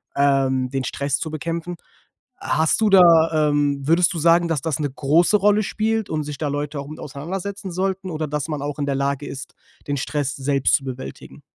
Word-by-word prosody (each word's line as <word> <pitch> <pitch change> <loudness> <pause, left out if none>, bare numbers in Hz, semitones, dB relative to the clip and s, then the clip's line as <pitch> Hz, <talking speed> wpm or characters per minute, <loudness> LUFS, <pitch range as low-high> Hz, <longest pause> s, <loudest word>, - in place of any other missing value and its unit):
ähm, 135 -2 +2
den 135 0 -2
Stress 140 +1 -1
zu 160 - -4
bekämpfen. 165 +3 -4 0.6
Hast 160 +1 +1
du 220 - +4
da, 165 -5 +5
ähm 145 -1 0
würdest 170 +2 +4
du 170 - -3
sagen, 170 +2 +4
dass 160 -5 -1
das 160 -1 -2
'ne 145 -1 -1
große 155 +8 +2
Rolle 210 +1 +3
spielt 220 +1 -1
und 155 -1 -2
sich 145 -1 -6
da 155 - -2
Leute 145 +1 -3
auch 140 - -7
mit 155 - -9
auseinandersetzen 190 +8 -6
sollten? 190 +1 -2
Oder 155 -1 -3
dass 150 0 -3
man 150 -2 -3
auch 145 +1 -4
in 145 - 0
der 140 -1 -1
Lage 140 +1 -2
ist, 135 0 -8 0.3
den 145 - -1
Stress 140 0 -2
selbst 135 0 +2
zu 135 - -1
bewältigen? 130 0 -8
150 Hz, 205 wpm, -22 LUFS, 140-170 Hz, 0.6 s, da